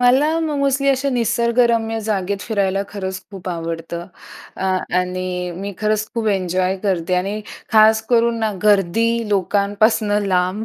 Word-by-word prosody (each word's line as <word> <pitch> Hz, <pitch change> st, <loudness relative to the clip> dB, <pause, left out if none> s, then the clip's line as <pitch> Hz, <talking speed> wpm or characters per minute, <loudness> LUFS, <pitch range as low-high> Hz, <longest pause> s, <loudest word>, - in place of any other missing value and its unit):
मला 260 Hz, +5 st, +4 dB
मग 305 Hz, -3 st, -1 dB
मोस्टली 275 Hz, 0 st, +1 dB
अशा 275 Hz, +1 st, +1 dB
निसर्गरम्य 235 Hz, -1 st, +1 dB
जागेत 200 Hz, -2 st, -2 dB
फिरायला 195 Hz, -3 st, 0 dB
खरंच 190 Hz, -2 st, -5 dB
खूप 190 Hz, -2 st, -8 dB
आवडतं 165 Hz, 0 st, -5 dB, 0.5 s
अ, -, -, -6 dB, 0.4 s
आणि 180 Hz, 0 st, -3 dB
मी 200 Hz, +2 st, -5 dB
खरंच 215 Hz, 0 st, 0 dB
खूप 225 Hz, -2 st, 0 dB
एन्जॉय 185 Hz, -1 st, 0 dB
करते 185 Hz, -3 st, 0 dB
आणि 200 Hz, +4 st, -1 dB, 0.3 s
खास 220 Hz, 0 st, +6 dB
करून 230 Hz, -1 st, +2 dB, 0.2 s
गर्दी 215 Hz, +3 st, +2 dB
लोकांपासनं 205 Hz, +2 st, +1 dB
लांब. 185 Hz, +3 st, 0 dB
205 Hz, 130 wpm, -19 LUFS, 185-230 Hz, 0.5 s, खास